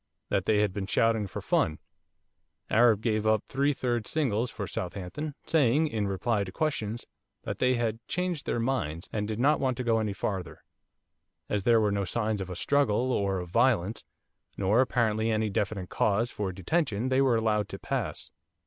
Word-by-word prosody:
That 95 - 0
they 105 -1 +3
had 105 -3 +1
been 95 -1 -4
shouting 110 -1 +2
for - - -7
fun. 80 - +1 0.9
Arab 115 -2 +5
gave 110 -2 0
up 110 -1 +3
three 140 +2 +1
third 120 -5 -2
singles 125 -6 0
for 105 - -5
Southampton, 100 - -5
saying, 150 0 +3
in 105 -5 -1
reply 100 +2 0
to 95 - -7
questions, 115 -4 -2 0.4
that - - -4
they 125 0 +3
had 115 -2 -1
changed 180 -4 -2
their - - 0
minds, 110 - -2
and 105 -1 -1
did 110 0 -3
not 145 +5 +3
want 130 -2 0
to 130 - -2
go 115 -2 +2
any 105 -2 -1
farther. 95 -4 -4 0.9
As 100 -2 -1
there 115 -1 +5
were 105 -2 +2
no 100 0 0
signs 105 +2 -1
of 95 - -5
a 90 - -5
struggle 130 +2 +1
or 100 -5 0
of 90 -1 -5
violence, 115 -1 +2 0.5
nor, 100 +5 +3
apparently, 115 -3 +1
any 110 -1 0
definite 95 -2 -2
cause 110 +4 +1
for 100 -3 -3
detention, 110 - -1
they 130 +1 +3
were 130 -3 +3
allowed 110 -2 +1
to - - -6
pass. - - -4
110 Hz, 185 wpm, -28 LUFS, 100-125 Hz, 0.9 s, Arab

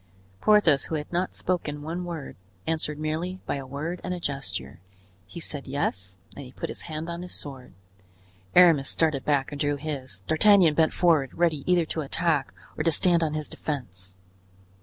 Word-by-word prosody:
Porthos, 175 - +4
who 160 - -3
had 150 +2 -5
not 180 +2 -1
spoken 150 -5 -2
one 170 +4 -4
word, 165 -5 -6 0.3
answered 155 -2 -1
merely 160 +5 -3
by - - -1
a 135 -1 -7
word 155 +6 -4
and 180 0 -2
a - - -6
gesture. 95 - -4 0.5
He 170 - -8
said 145 -4 -4
"yes" 95 -9 -2 0.2
and 140 - -7
he 125 - -11
put - - -5
his - - -6
hand 155 +1 -4
on 170 0 -5
his 180 - -6
sword. 135 -6 -8 0.8
Aramis 165 -6 +6
started 155 -5 +1
back 145 0 +1
and 145 0 -5
drew 145 -1 +1
his. 135 -9 -6
D'Artagnan 170 - +5
bent 160 +1 +3
forward, 160 -7 +2
ready 165 -5 +1
either 175 -2 +4
to 160 - -3
attack 155 -1 0 0.2
or - - -2
to 165 - +3
stand 170 +2 +4
on 155 -2 0
his 155 -1 -2
defense. 95 - -6
155 Hz, 180 wpm, -26 LUFS, 140-170 Hz, 0.8 s, Aramis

